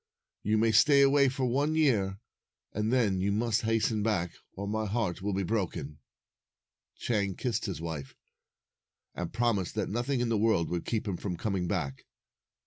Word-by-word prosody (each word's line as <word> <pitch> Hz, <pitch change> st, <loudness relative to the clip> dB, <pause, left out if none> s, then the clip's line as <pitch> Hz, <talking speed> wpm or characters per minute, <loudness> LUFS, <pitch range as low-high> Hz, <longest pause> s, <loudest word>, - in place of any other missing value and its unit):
You 110 Hz, +1 st, +1 dB
may 110 Hz, +1 st, +3 dB
stay 140 Hz, +6 st, +6 dB
away 140 Hz, 0 st, +5 dB
for 130 Hz, 0 st, -2 dB
one 140 Hz, +5 st, +1 dB
year, 105 Hz, -11 st, +2 dB, 0.5 s
and 105 Hz, +2 st, -1 dB
then 110 Hz, -7 st, +2 dB
you 100 Hz, +2 st, +1 dB
must 110 Hz, +2 st, +1 dB
hasten 110 Hz, -1 st, +1 dB
back, 90 Hz, -6 st, 0 dB, 0.2 s
or 100 Hz, +1 st, -5 dB
my 110 Hz, +1 st, -1 dB
heart 100 Hz, -5 st, -1 dB
will 100 Hz, 0 st, -1 dB
be 100 Hz, -, 0 dB
broken." 85 Hz, -7 st, -3 dB, 1.0 s
Chang 100 Hz, -5 st, -1 dB
kissed 115 Hz, -4 st, -2 dB
his 95 Hz, -, -4 dB
wife, 80 Hz, -5 st, -6 dB, 1.0 s
and 90 Hz, -, -4 dB
promised 110 Hz, -6 st, 0 dB
that 105 Hz, -, -1 dB
nothing 120 Hz, +5 st, -1 dB
in 120 Hz, -1 st, 0 dB
the 110 Hz, -2 st, +1 dB
world 110 Hz, -6 st, +2 dB
would 85 Hz, -1 st, -2 dB
keep 110 Hz, -2 st, -2 dB
him 95 Hz, -3 st, -2 dB
from 90 Hz, -2 st, -4 dB
com 100 Hz, +1 st, -2 dB
ing 90 Hz, -2 st, -1 dB
back. 75 Hz, -8 st, -3 dB
105 Hz, 175 wpm, -30 LUFS, 95-120 Hz, 1.0 s, stay